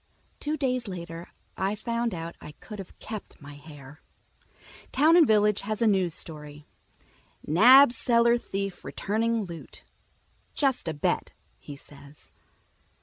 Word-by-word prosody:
Two 300 +1 -2
days 255 -4 -1
later 170 -2 -7 0.3
I 195 +2 -1
find 235 0 -2
out 165 0 -6
I 150 - -10
could've 200 +3 -11
kept 215 -2 -9
my 145 0 -11
hair. 145 0 -13 0.9
Town 310 +5 +4
and 335 -4 +6
Village 210 -1 +3
has 215 +1 -4
a 230 - +2
new 190 -4 +3
story: 150 -2 -7 0.8
"Nab 245 - +7
Cellar 235 0 +3
Thief 195 -4 -5
Returning 225 +2 -1
Loot. 170 -4 -10 0.7
'Just 270 - 0
A 160 - -2
Bet,' 145 - -1 0.3
He 145 - -10
Says." 140 - -16
195 Hz, 130 wpm, -27 LUFS, 160-235 Hz, 0.9 s, Nab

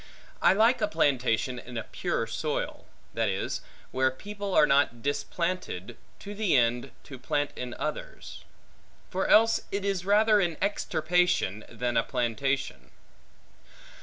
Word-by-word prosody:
I - - +6
like 225 +5 +3
a 210 - +3
plantation 130 - +1
in 125 0 -8
a 110 - -2
pure - - -2
soil; - - -3 0.3
that - - 0
is, - - -2 0.3
where 130 0 +2
people 200 +8 -6
are 150 - +7
not 140 -5 +2
displanted, 145 - -3 0.2
to 205 - -8
the 205 -8 +2
end, 120 +2 +1
to 130 -3 -10
plant 145 +3 -1
in 125 -1 -5
others. - - -6 0.7
For 190 +1 -1
else 225 +1 +5
it 200 0 -2
is 195 -3 -1
rather 210 +2 +4
an 170 -5 0
extirpation, 180 - 0
than 120 -1 -2
a - - +3
plantation. 130 +2 -2
150 Hz, 135 wpm, -28 LUFS, 125-200 Hz, 0.7 s, are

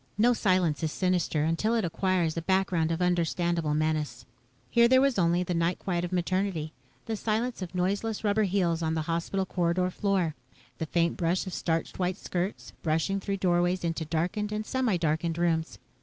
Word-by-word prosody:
No 240 +3 +5
silence 185 -8 +1
is 160 -2 -1
sinister 180 -5 0
until 165 +9 +1
it 225 -5 +1
acquires 175 -1 0
a 165 - -2
background 180 -3 +1
of 165 +2 0
understandable 170 -2 +1
menace. 150 -5 -1 0.5
Here 235 0 +6
there 260 +2 +5
was 270 -5 +2
only 175 0 +3
the 180 - -2
night 170 +1 +1
quiet 175 -2 -2
of 175 - -3
Maternity, 180 -3 -1 0.3
the 225 - -2
silence 225 +2 -1
of 185 0 -6
noiseless 200 +5 -1
rubber 210 0 +2
heels 175 -4 +1
on 160 0 0
the 160 - -1
hospital 170 +4 -1
corridor 180 0 0
floor, 190 -5 0 0.5
the 160 - -2
faint 170 +1 +1
brush 175 +3 0
of 185 - -6
starched 165 +2 -2
white 180 0 0
skirts 185 +1 -4
brushing 165 +5 0
through 195 0 -2
doorways 175 -1 +1
into 165 -1 -1
darkened 180 +7 -1
and 215 0 -2
semi 250 -7 +1
darkened 160 0 0
rooms. 165 -1 0
175 Hz, 180 wpm, -28 LUFS, 165-195 Hz, 0.5 s, Here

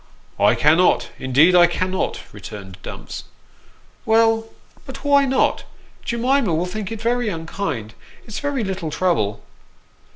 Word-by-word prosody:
" - - -32
I - - +3
cannot, 160 +5 +3
indeed 140 +7 +4
I 175 -1 +7
cannot," 185 +2 -2
returned 95 -3 -9
Dumps. - - -8 0.4
" - - -32
Well, 225 0 +3 0.4
but - - -9
why 280 -1 +5
not? 265 0 +1 0.4
Jemima 235 - +1
will 170 +3 0
think 195 +2 -5
it 225 - -5
very 240 -1 +1
unkind. 160 - -4 0.3
It's 215 - -6
very 285 -4 -1
little 190 -5 -3
trouble." 155 - 0
185 Hz, 135 wpm, -21 LUFS, 160-230 Hz, 0.4 s, I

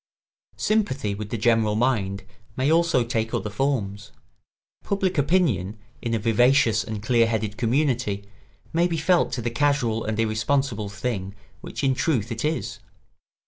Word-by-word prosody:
] - - -75
Sympathy 145 - 0
with 105 +1 -6
the 115 - -2
general 110 -1 +2
mind 105 -5 0 0.3
may 135 +3 +2
also 165 -6 +3
take 115 -1 -2
other 105 - -3
forms. 105 -4 -2 0.7
Public 190 -4 0
opinion, 135 - +1 0.2
in 115 -2 -1
a - - +2
vivacious 115 +1 +3
and 105 0 -6
clear 115 0 +3
headed 110 -2 -2
community, 120 -5 0 0.5
may 170 +2 +3
be 170 -2 -2
felt 175 +3 +2
to 120 - -3
be 120 - -1
the - - -16
casual 130 -6 +1
and 110 0 -3
irresponsible 110 0 0
thing 100 -2 -4 0.2
which - - -7
in 135 -1 +3
truth 125 - 0
it 115 0 -3
is. 155 +1 -2
115 Hz, 155 wpm, -24 LUFS, 105-140 Hz, 0.7 s, also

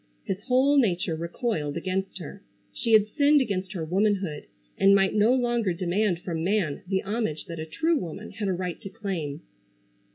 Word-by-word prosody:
His 195 +1 -3
whole 270 +3 +4
nature 180 -7 +1
recoiled 170 - -2
against 190 +3 -2
her. 185 +3 -9 0.3
She 225 - -1
had 215 -1 +6
sinned 290 0 +5
against 195 -6 -2
her 170 -4 -3
womanhood, 190 -3 0 0.3
and 195 0 +5
might 195 -1 +3
no 215 +2 +4
longer 240 -6 +1
demand 180 +1 0
from 165 -3 -3
man 185 -6 0
the 190 0 0
homage 205 -7 -2
that 165 -1 -7
a 155 - -5
true 320 - +1
woman 180 +5 -7
had 210 -2 -4
a 190 - +1
right 180 -1 -4
to 195 - -7
claim. 190 -10 -4
195 Hz, 175 wpm, -26 LUFS, 170-215 Hz, 0.3 s, had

